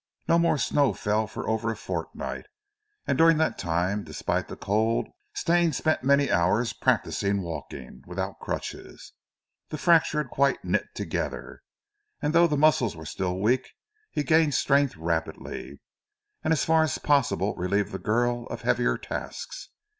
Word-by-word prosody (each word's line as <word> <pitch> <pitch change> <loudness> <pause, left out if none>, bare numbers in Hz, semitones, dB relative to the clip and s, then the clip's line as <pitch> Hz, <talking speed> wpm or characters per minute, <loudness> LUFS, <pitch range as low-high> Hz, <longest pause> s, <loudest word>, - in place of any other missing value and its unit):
No 170 - +4
more 170 -2 +3
snow 140 -4 +2
fell 105 +3 0
for - - -6
over 110 +1 0
a 115 - -2
fortnight, - - -5 0.6
and - - 0
during 165 -1 +6
that 160 - 0
time, 90 +5 0
despite - - -2
the - - -7
cold, 110 +3 +1 0.3
Stane 170 -2 +2
spent 155 +1 0
many 140 +1 +3
hours 95 +7 +2
practising 100 -1 0
walking 80 -6 -7
without 95 +2 -4
crutches. - - -6 0.6
The 155 - -4
fracture 165 -1 +3
had 150 -5 -2
quite 140 0 +1
knit - - 0
together, - - -4 0.6
and 150 - -1
though 170 +1 +6
his 150 -3 0
muscles 140 -7 +3
were 80 - -10
still 90 +4 -2
weak, 120 +7 +1 0.4
he 150 - -2
gained 155 0 +3
strength 140 0 +2
rapidly, - - -4 0.6
and 160 - 0
as 160 - +2
far 160 0 +4
as 155 -3 0
possible 110 -9 +1
relieved 100 +3 0
the 95 - -5
girl 120 +4 0
of - - -7
heavier - - +2
tasks. - - -6
120 Hz, 155 wpm, -26 LUFS, 100-155 Hz, 0.6 s, during